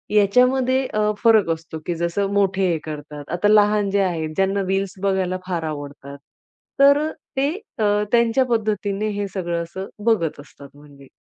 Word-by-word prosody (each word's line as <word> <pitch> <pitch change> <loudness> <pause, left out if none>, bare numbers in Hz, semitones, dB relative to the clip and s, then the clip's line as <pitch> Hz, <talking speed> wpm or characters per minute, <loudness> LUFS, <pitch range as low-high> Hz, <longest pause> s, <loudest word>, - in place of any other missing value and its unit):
याच्यामध्ये 250 +5 +3
अ, 210 0 0
फरक 220 -6 +5
असतो. 160 0 -4
की 175 - -2
जसं 170 +4 -1
मोठे 195 -1 +2
हे 165 - 0
करतात. 150 -1 -7
आता 180 +4 +1
लहान 210 -1 +4
जे 200 0 +2
आहेत, 165 -4 -2
ज्यांना 195 +2 +1
रील्स 195 0 -1
बघायला 190 -2 0
फार 175 -3 -2
आवडतात, 145 -2 -7 0.6
तर 280 +1 +7
अ, - - -4 0.3
ते 275 +2 +2 0.3
अ, - - +1 0.3
त्यांच्या 235 +2 +3
पद्धतीने 215 -3 -1
हे 200 - -1
सगळं 170 -3 -2
असं 190 +3 -7 0.2
बघत 180 -11 +1
असतात, 140 -1 -13
म्हणजे. 145 -1 -16
195 Hz, 160 wpm, -21 LUFS, 165-215 Hz, 0.6 s, तर